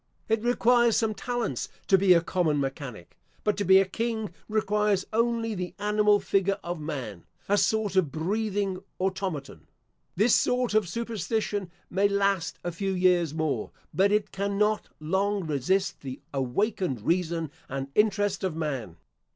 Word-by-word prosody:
It 225 Hz, -1 st, +1 dB
requires 240 Hz, -1 st, +4 dB
some 225 Hz, -2 st, +1 dB
talents 235 Hz, -, -3 dB, 0.2 s
to 195 Hz, -, +5 dB
be 190 Hz, -1 st, +6 dB
a 170 Hz, -, +4 dB
common 170 Hz, -5 st, +1 dB
mechanic; 135 Hz, -, -5 dB, 0.2 s
but 210 Hz, -2 st, +1 dB
to 205 Hz, -, 0 dB
be 190 Hz, 0 st, +7 dB
a 195 Hz, -, +5 dB
king 220 Hz, +2 st, -3 dB, 0.2 s
requires 210 Hz, -2 st, +1 dB
only 230 Hz, 0 st, +1 dB
the 180 Hz, -2 st, -5 dB
animal 210 Hz, 0 st, +3 dB
figure 195 Hz, 0 st, +1 dB
of 175 Hz, -1 st, -4 dB
man 130 Hz, -, -5 dB, 0.2 s
a 205 Hz, -, +3 dB
sort 210 Hz, -1 st, +1 dB
of 175 Hz, -7 st, +3 dB
breathing 195 Hz, +3 st, -1 dB, 0.2 s
automaton. 185 Hz, -6 st, -3 dB, 0.5 s
This 215 Hz, +5 st, +4 dB
sort 250 Hz, -2 st, +2 dB
of 215 Hz, -5 st, +2 dB
superstition 220 Hz, -2 st, -2 dB, 0.2 s
may 195 Hz, +3 st, +3 dB
last 200 Hz, -4 st, 0 dB
a 175 Hz, -, -2 dB
few 195 Hz, +3 st, -2 dB
years 180 Hz, -4 st, +2 dB
more, 155 Hz, -2 st, -1 dB, 0.2 s
but 195 Hz, +2 st, +3 dB
it 210 Hz, 0 st, +1 dB
cannot 200 Hz, +2 st, 0 dB
long 190 Hz, +4 st, 0 dB
resist 160 Hz, +7 st, 0 dB
the 130 Hz, -2 st, -6 dB
awakened 135 Hz, -, -1 dB
reason 165 Hz, -3 st, 0 dB, 0.2 s
and 135 Hz, +1 st, -4 dB
interest 205 Hz, -1 st, +2 dB
of 185 Hz, -4 st, -1 dB
man. 135 Hz, -, -3 dB
195 Hz, 150 wpm, -27 LUFS, 165-210 Hz, 0.5 s, be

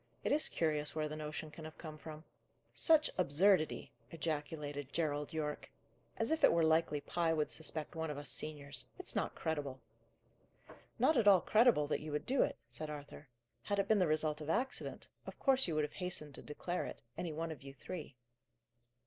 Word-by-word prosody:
"It -, -, 0 dB
is 300 Hz, +2 st, +2 dB
curious 150 Hz, -2 st, 0 dB
where 155 Hz, -1 st, 0 dB
the 155 Hz, -, -5 dB
notion 150 Hz, 0 st, -5 dB
can 160 Hz, -, -10 dB
have 155 Hz, 0 st, -9 dB
come 155 Hz, -2 st, -7 dB
from." 155 Hz, 0 st, -9 dB, 0.5 s
"Such 315 Hz, -2 st, +4 dB
absurdity!" 180 Hz, +1 st, +3 dB, 0.2 s
ejaculated 145 Hz, -3 st, -3 dB
Gerald 150 Hz, -3 st, -1 dB
Yorke. 150 Hz, -2 st, -3 dB, 0.5 s
"As 225 Hz, +6 st, 0 dB
if 320 Hz, -, +1 dB
it -, -, +8 dB
were 170 Hz, -1 st, +3 dB
likely 160 Hz, -2 st, +3 dB
Pye 165 Hz, +3 st, 0 dB
would 150 Hz, -2 st, 0 dB
suspect 160 Hz, 0 st, -3 dB
one 160 Hz, -1 st, -2 dB
of 150 Hz, -, -4 dB
us 145 Hz, -, -5 dB
seniors! 140 Hz, -5 st, -3 dB
It's -, -, -1 dB
not -, -, 0 dB
credible." 145 Hz, -5 st, -2 dB, 1.2 s
"Not 315 Hz, -, +4 dB
at 225 Hz, -3 st, +4 dB
all 190 Hz, -3 st, +8 dB
credible 220 Hz, -9 st, +5 dB
that -, -, -1 dB
you 155 Hz, 0 st, -5 dB
would 150 Hz, -, -2 dB
do 265 Hz, +1 st, +2 dB
it," -, -, +1 dB
said 125 Hz, +6 st, -6 dB
Arthur. 145 Hz, 0 st, -8 dB, 0.3 s
"Had 205 Hz, +11 st, -1 dB
it 200 Hz, 0 st, +1 dB
been 215 Hz, -1 st, +4 dB
the 180 Hz, -, +4 dB
result 155 Hz, 0 st, +1 dB
of 150 Hz, -, -5 dB
accident, 250 Hz, +9 st, -1 dB, 0.2 s
of -, -, -7 dB
course 270 Hz, -4 st, +3 dB
you 165 Hz, -, -1 dB
would 155 Hz, -, +2 dB
have 150 Hz, -, -3 dB
hastened 180 Hz, -6 st, -3 dB
to -, -, -7 dB
declare 175 Hz, +4 st, -3 dB
it, -, -, -9 dB
any 175 Hz, -, -3 dB
one 165 Hz, +2 st, -3 dB
of 150 Hz, -, -8 dB
you 135 Hz, 0 st, -9 dB
three." 140 Hz, +1 st, -7 dB
155 Hz, 195 wpm, -36 LUFS, 150-175 Hz, 1.2 s, it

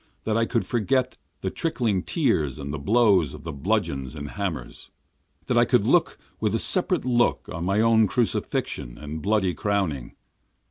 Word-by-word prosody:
That 110 Hz, -, -1 dB
I 115 Hz, 0 st, +2 dB
could 115 Hz, -, 0 dB
forget 130 Hz, +2 st, 0 dB, 0.3 s
the 95 Hz, -, -2 dB
trickling 120 Hz, -, 0 dB
tears 100 Hz, -, 0 dB
and 70 Hz, -1 st, -5 dB
the 75 Hz, -, -3 dB
blows 100 Hz, -, +3 dB
of 75 Hz, -, -12 dB
the 80 Hz, -, -5 dB
bludgeons 70 Hz, -1 st, -1 dB
and 75 Hz, -1 st, -6 dB
hammers! 90 Hz, -, -5 dB, 0.6 s
That -, -, +2 dB
I -, -, +5 dB
could -, -, +2 dB
look -, -, +3 dB, 0.2 s
with -, -, 0 dB
a -, -, +3 dB
separate -, -, 0 dB
look 120 Hz, -1 st, +1 dB
on 85 Hz, +1 st, -4 dB
my 100 Hz, +3 st, +2 dB
own 110 Hz, -1 st, +4 dB
crucifixion 100 Hz, -, -2 dB
and 75 Hz, +2 st, -6 dB
bloody 100 Hz, -2 st, +1 dB
crowning. 95 Hz, -, -2 dB
95 Hz, 170 wpm, -25 LUFS, 75-115 Hz, 0.6 s, I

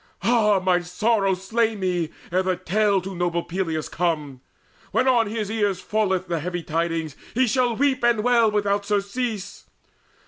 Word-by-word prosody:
Ah, 225 Hz, -3 st, +4 dB
might 185 Hz, -, -3 dB, 0.2 s
my -, -, -7 dB
sorrow 195 Hz, +2 st, +1 dB
slay 220 Hz, +4 st, 0 dB
me, 180 Hz, -5 st, -1 dB, 0.2 s
ere 185 Hz, +2 st, +2 dB
the 185 Hz, -1 st, 0 dB
tale 200 Hz, +2 st, +1 dB
To 195 Hz, +1 st, -6 dB
noble 175 Hz, -1 st, -1 dB
Peleus 165 Hz, -4 st, -3 dB
come! 150 Hz, -7 st, -2 dB, 0.5 s
When 255 Hz, -, +2 dB
on 240 Hz, -4 st, +4 dB
his 215 Hz, -1 st, -3 dB
ears 205 Hz, -4 st, 0 dB
Falleth 190 Hz, -4 st, 0 dB
the 170 Hz, -1 st, -1 dB
heavy 175 Hz, +1 st, -4 dB
tidings, 165 Hz, -2 st, -2 dB, 0.2 s
he 260 Hz, +2 st, +4 dB
shall 245 Hz, 0 st, +1 dB
weep 270 Hz, 0 st, +1 dB
And 235 Hz, -3 st, +3 dB
wail 235 Hz, -2 st, +4 dB
without 205 Hz, -1 st, 0 dB
surcease. 205 Hz, +1 st, -3 dB
200 Hz, 165 wpm, -23 LUFS, 175-225 Hz, 0.5 s, Ah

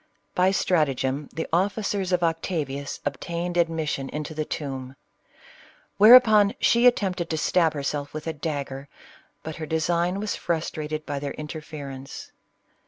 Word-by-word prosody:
By 180 Hz, +1 st, +3 dB
stratagem 145 Hz, -7 st, 0 dB
the 160 Hz, -, -3 dB
officers 195 Hz, +1 st, 0 dB
of 180 Hz, -1 st, +2 dB
Octavius 160 Hz, -4 st, -2 dB
obtained 170 Hz, +5 st, -3 dB
ad 170 Hz, -1 st, +3 dB
mission 150 Hz, -4 st, -3 dB
into 150 Hz, +1 st, -5 dB
the 155 Hz, 0 st, -2 dB
tomb; 135 Hz, -4 st, -5 dB, 1.0 s
whereupon 215 Hz, -2 st, +8 dB
she 235 Hz, +1 st, +5 dB
attempted 185 Hz, -7 st, +1 dB
to 160 Hz, -, -1 dB
stab 165 Hz, 0 st, +2 dB
herself 145 Hz, 0 st, -3 dB
with 155 Hz, 0 st, -7 dB
a 160 Hz, -, -2 dB
dagger, 140 Hz, -3 st, -5 dB, 0.5 s
but 160 Hz, 0 st, -6 dB
her 155 Hz, -2 st, -5 dB
design 170 Hz, +4 st, 0 dB
was 210 Hz, 0 st, -2 dB
frustra 160 Hz, -2 st, -3 dB
ted 155 Hz, 0 st, -4 dB
by 145 Hz, -1 st, -3 dB
their 140 Hz, 0 st, -4 dB
interference. 150 Hz, -3 st, -8 dB
160 Hz, 140 wpm, -25 LUFS, 145-180 Hz, 1.0 s, whereupon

